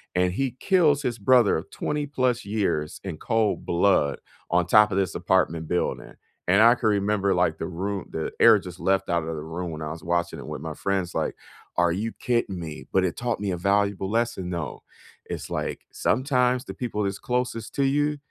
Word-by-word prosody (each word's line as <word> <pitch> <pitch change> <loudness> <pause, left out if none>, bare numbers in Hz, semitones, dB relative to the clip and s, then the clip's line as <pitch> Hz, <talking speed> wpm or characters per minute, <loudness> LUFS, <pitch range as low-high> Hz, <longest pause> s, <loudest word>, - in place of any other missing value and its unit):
and 90 0 +2
he 130 +3 -1
kills 155 -7 +3
his 120 -3 -2
brother 120 0 +5
of 90 +5 -7
20+ 135 -5 -1
years 100 -7 -1
in 95 -5 -5
cold 115 +3 0
blood 85 -5 +2 0.3
on 90 0 +2
top 105 +3 +5
of 95 - 0
this 95 -1 0
apartment 85 -3 +1
building. 90 - -2 0.3
And 100 +4 +5
I 120 +1 +8
can 120 -3 0
remember, 100 -1 +1
like, 85 -3 +1
the - - -3
roo 95 +2 -3
the 80 - -3
air - - +8
just 90 0 -8
left 95 0 +1
outta 85 -2 0
the 80 - -3
room 80 +3 -5
when 75 0 -6
I 75 - -4
was 80 +3 -8
watching 85 0 -1
it - - -9
with - - -6
my 80 0 -5
friends, 95 +1 -2
like, - - -1 0.4
"Are 85 -1 +3
you 105 +6 -2
kidding 115 -7 -1
me?" 75 -5 -7
But 95 - +3
it 90 - -2
taught 120 -3 -2
me 100 -1 -2
a 90 - -2
valuable 100 +1 +1
lesson, 115 -5 -1
though. 85 -5 -4 0.4
It's, - - -6
like, - - -3
sometimes 125 0 +1
the - - -7
people 110 -4 -3
that's 100 0 -2
closest 125 -2 -2
to 140 - +2
you 145 +2 +1
100 Hz, 200 wpm, -25 LUFS, 85-120 Hz, 0.4 s, I